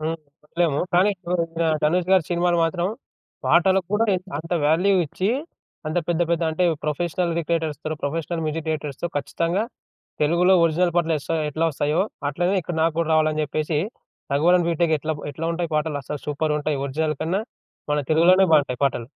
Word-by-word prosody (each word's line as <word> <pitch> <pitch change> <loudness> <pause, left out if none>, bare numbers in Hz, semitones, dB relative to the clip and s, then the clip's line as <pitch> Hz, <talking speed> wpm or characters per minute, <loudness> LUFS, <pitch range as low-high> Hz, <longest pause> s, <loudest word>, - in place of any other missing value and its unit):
హ్మ్. 160 +1 -2 0.3
చెప్పలేము 160 -2 0 0.2
కానీ 185 +4 +5 0.7
ధనుష్ 175 +4 +1
గారి 185 -4 +5
సినిమాలు 175 0 +2
మాత్రం, 170 +2 -1 0.6
పాటలకు 185 +1 +3
కూడా 220 +2 +3 0.3
అంత 165 +3 -6
వాల్యూ 180 +6 +3
ఇచ్చి, 190 +8 -1 0.6
అంత 155 +3 0
పెద్ద 175 0 +2
పెద్ద 170 0 +1
అంటే 160 +3 0 0.2
ప్రొఫెషనల్ 170 +3 -1
రిక్రియేటర్స్‌తో, 160 -2 -2
ప్రొఫెషనల్ 165 +3 -2
మ్యూజిక్ 155 +1 -3
డైరెక్టర్స్‌తో 150 +1 -3
ఖచ్చితంగా 165 +8 -1 0.6
తెలుగులో 175 +5 +4
ఒరిజినల్ 170 +2 +2
పాటలు 165 -2 +2
ఎస్త 140 - -11 0.2
ఎట్లా 155 +3 -1
వస్తాయో, 150 +4 0 0.3
అట్లనే 175 +7 0
ఇక్కడ 175 +1 -5
నాకు 165 -1 +2
గూడా 165 -1 0
రావాలని 155 -1 +2
చెప్పేసి 150 +1 -1 0.5
'రఘువరన్ 170 +4 +3
బీటెక్' 170 -1 +2
ఎట్లా 155 +2 -2 0.2
ఎట్లా 155 +3 -5
ఉంటాయి 170 -1 -3
పాటలు, 150 0 0
అస్సలు 145 +2 -6
సూపర్ 150 +1 -1
ఉంటాయి. 150 -1 -1
ఒరిజినల్ 155 +2 -1
కన్నా, 180 +6 0 0.5
మన 150 - +2
తెలుగులోనే 175 +4 +5
బాగుంటాయి 140 -5 +3
పాటలు. 120 -4 -1
160 Hz, 155 wpm, -23 LUFS, 150-175 Hz, 0.7 s, కానీ